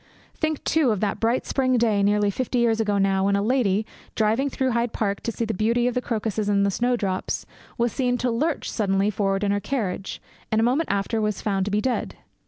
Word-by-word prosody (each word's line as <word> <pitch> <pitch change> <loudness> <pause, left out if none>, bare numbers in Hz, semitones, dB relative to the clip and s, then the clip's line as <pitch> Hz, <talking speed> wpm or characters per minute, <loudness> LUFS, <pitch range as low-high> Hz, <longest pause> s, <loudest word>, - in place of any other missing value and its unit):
Think, 315 -2 -2
too, 315 -5 +2
of 210 -4 +1
that 205 -2 -1
bright 230 +3 +1
spring 255 -2 +1
day, 220 -4 +2
nearly 205 0 +2
fifty 255 +3 -2
years 230 -2 +2
ago 210 -2 +1
now, 195 -1 +2
when 200 0 +2
a 200 - +1
lady, 220 -4 +1 0.3
driving 225 +6 +1
through 260 -1 -1
Hyde 235 0 0
Park 200 -2 -1
to 230 - -2
see 230 - -2
the 220 - -2
beauty 230 +5 +1
of 250 - 0
the 250 - 0
crocuses 220 -3 -2
and 200 -1 +3
the 200 - +1
snowdrops, 230 -4 -1 0.3
was 235 -1 +1
seen 250 -2 0
to 245 0 0
lurch 295 +7 -1
suddenly 200 -1 +1
forward 195 -1 0
in 200 - +1
her 205 - +1
carriage, 200 -6 -3 0.3
and 220 - +2
a - - +3
moment 265 +7 +1
after 200 +3 0
was 210 -2 -1
found 195 -2 0
to 205 - -3
be 210 +1 +1
dead. 245 -3 -2
220 Hz, 225 wpm, -24 LUFS, 200-245 Hz, 0.3 s, and